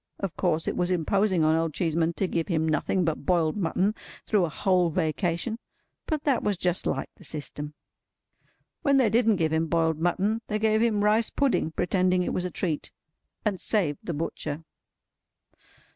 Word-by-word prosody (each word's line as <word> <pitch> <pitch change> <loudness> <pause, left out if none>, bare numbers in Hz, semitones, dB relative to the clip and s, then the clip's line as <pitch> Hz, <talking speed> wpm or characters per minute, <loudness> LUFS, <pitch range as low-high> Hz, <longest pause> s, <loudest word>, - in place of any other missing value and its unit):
Of 195 -4 -3
course 165 -3 0
it - - -1
was 180 0 0
imposing 185 +1 +2
on 155 +1 +4
Old 165 -2 -1
Cheeseman 165 -1 +1
to 195 - 0
give 165 -2 -1
him 160 -3 0
nothing 160 +4 +1
but 160 -2 -2
boiled 170 -4 +2
mutton 195 +1 +1 0.3
through 205 -5 +2
a - - -3
whole 180 +1 +2
Vacation, 170 +7 -1 0.5
but 310 -2 -1
that 275 -4 +2
was 205 -3 0
just 180 0 0
like - - -2
the - - -15
system. 150 0 -5 1.1
When 280 -4 +3
they 245 -6 +3
didn't 225 -1 +4
give 160 -3 0
him 160 +1 +1
boiled 160 -1 +1
mutton, 190 +6 +1
they 215 - -1
gave 220 0 +2
him 215 -3 +2
rice 215 +2 +3
pudding, 275 - +1
pretending 180 +1 +1
it - - -2
was 180 - -1
a - - -1
treat. 165 -3 -3 0.5
And 200 -3 0
saved 170 -10 0
the 170 - -4
butcher. 155 0 -4
180 Hz, 175 wpm, -27 LUFS, 160-210 Hz, 1.1 s, on